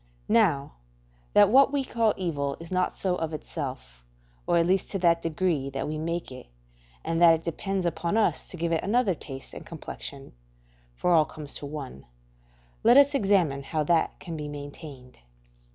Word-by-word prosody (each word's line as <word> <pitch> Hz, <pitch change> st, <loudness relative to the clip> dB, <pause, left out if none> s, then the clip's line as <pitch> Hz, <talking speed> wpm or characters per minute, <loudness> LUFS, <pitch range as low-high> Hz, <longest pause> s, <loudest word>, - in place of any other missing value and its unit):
Now, 175 Hz, -, +2 dB, 0.6 s
that 205 Hz, -1 st, +6 dB
what 275 Hz, +2 st, +6 dB
we 280 Hz, -2 st, 0 dB
call 230 Hz, -3 st, +1 dB
evil 145 Hz, -6 st, -2 dB
is 165 Hz, +1 st, -10 dB
not 185 Hz, 0 st, 0 dB
so 180 Hz, -2 st, 0 dB
of 160 Hz, -1 st, -3 dB
itself, 130 Hz, -, -6 dB, 0.4 s
or -, -, +3 dB
at 165 Hz, -, +3 dB
least 185 Hz, +2 st, +1 dB
to 195 Hz, -, -2 dB
that 170 Hz, -2 st, +3 dB
degree 165 Hz, -4 st, -1 dB
that 135 Hz, 0 st, -4 dB
we 155 Hz, 0 st, -3 dB
make 170 Hz, -1 st, -3 dB
it, 130 Hz, -, -10 dB, 0.6 s
and 165 Hz, +1 st, -1 dB
that 165 Hz, -1 st, +8 dB
it 165 Hz, -, -7 dB
depends 190 Hz, +3 st, -2 dB
upon 170 Hz, +3 st, -1 dB
us 225 Hz, -, +1 dB
to 180 Hz, -, -9 dB
give 170 Hz, 0 st, -1 dB
it 165 Hz, -, 0 dB
another 215 Hz, -1 st, +2 dB
taste 135 Hz, -4 st, -9 dB
and -, -, -8 dB
complexion 140 Hz, -3 st, -8 dB, 0.6 s
(for 180 Hz, -, 0 dB
all 160 Hz, -2 st, +5 dB
comes 150 Hz, -2 st, -9 dB
to 145 Hz, -, -6 dB
one), 140 Hz, -, -8 dB, 0.8 s
let 240 Hz, +3 st, +7 dB
us 285 Hz, +1 st, +6 dB
examine 195 Hz, -, +2 dB
how 155 Hz, +2 st, -2 dB
that 165 Hz, +1 st, +1 dB
can 170 Hz, -, -7 dB
be 150 Hz, -1 st, -5 dB
maintained. 145 Hz, -3 st, -10 dB
165 Hz, 180 wpm, -27 LUFS, 145-190 Hz, 0.8 s, that